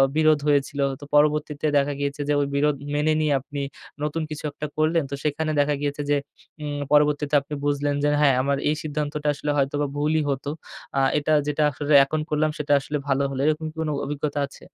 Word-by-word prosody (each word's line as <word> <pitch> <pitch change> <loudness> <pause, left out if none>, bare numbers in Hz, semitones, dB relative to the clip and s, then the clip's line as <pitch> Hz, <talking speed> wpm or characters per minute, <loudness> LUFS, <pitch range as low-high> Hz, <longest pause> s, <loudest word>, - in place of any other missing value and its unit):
বিরোধ 155 -1 +4
হয়েছিল। 145 0 +1 0.2
তো 145 - -12
পরবর্তীতে 150 0 +2
দেখা 140 +1 +1
গিয়েছে 140 0 -2
যে - - +4
ওই 140 - 0
বিরোধ 150 +1 +2 0.2
মেনে 155 +1 +2
নিয়ে 150 -2 +2
আপনি 140 +2 -6 0.4
নতুন 150 +2 -1
কিছু 150 0 -6
একটা 150 - -6
করলেন। 155 +1 +2
তো 140 - -1
সেখানে 155 +1 -1
দেখা 145 +1 +2
গিয়েছে 145 0 -2
যে 145 - +4 0.5
উম 145 -1 -3
পরবর্তীতে 150 0 +3
আপনি 140 +2 -9
বুঝলেন 145 0 +1
যে 145 - +3
হ্যাঁ, 140 -3 +5
আমার 140 +1 0
এই 150 - +1
সিদ্ধান্তটা 150 0 -3
আসলে 145 +1 -2
হয়তোবা 145 +1 +1
ভুলই 155 +2 +1
হত। 135 0 -2 0.5
আ - - +3 0.2
এটা 150 +1 0 0.2
যেটা 150 +1 +1
আসলে 145 +1 -1
এখন 155 +3 -2
করলাম 155 0 +1
সেটা 145 -1 0
আসলে 150 +2 -3
ভালো 140 0 +2
হলো। 135 -1 -5
এরকম 155 +1 +1
কোন 160 -1 -1 0.2
অভিজ্ঞতা 145 0 -2
আছে? - - -15
145 Hz, 195 wpm, -24 LUFS, 145-150 Hz, 0.5 s, হ্যাঁ